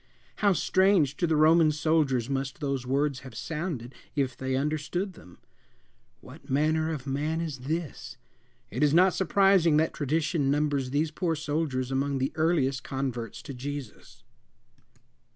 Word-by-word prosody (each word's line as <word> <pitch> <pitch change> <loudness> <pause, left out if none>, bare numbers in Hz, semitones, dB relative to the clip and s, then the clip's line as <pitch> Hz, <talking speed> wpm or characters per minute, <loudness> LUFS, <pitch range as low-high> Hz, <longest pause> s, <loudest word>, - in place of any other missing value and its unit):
How 205 -2 +3
strange 185 -5 +3
to 175 - +1
the 160 - +2
Roman 155 +1 +5
soldiers 150 -6 +1
must 135 +1 -3
those 140 -4 -2
words 140 +1 0
have 130 -4 -12
sounded, 150 -4 -4 0.2
if 135 -4 0
they 130 +1 -2
understood 155 +7 -2
them! 90 - -16 0.8
"What - - -14
manner 155 +3 +1
of 145 -4 -5
man 150 +4 -1
is 155 -5 -4
this?" 155 -6 -4 0.5
It - - -3
is 150 0 +4
not 185 +2 +5
surprising 190 -4 +4
that 160 +1 +1
tradition 155 0 0
numbers 145 -2 0
these 150 +3 0
poor 165 0 -1
soldiers 145 -4 -2
among 135 +1 0
the 130 +1 -1
earliest 155 -5 +1
converts 130 -4 -4
to 140 - -7
Jesus. 135 -2 -8
150 Hz, 145 wpm, -28 LUFS, 135-160 Hz, 0.8 s, Roman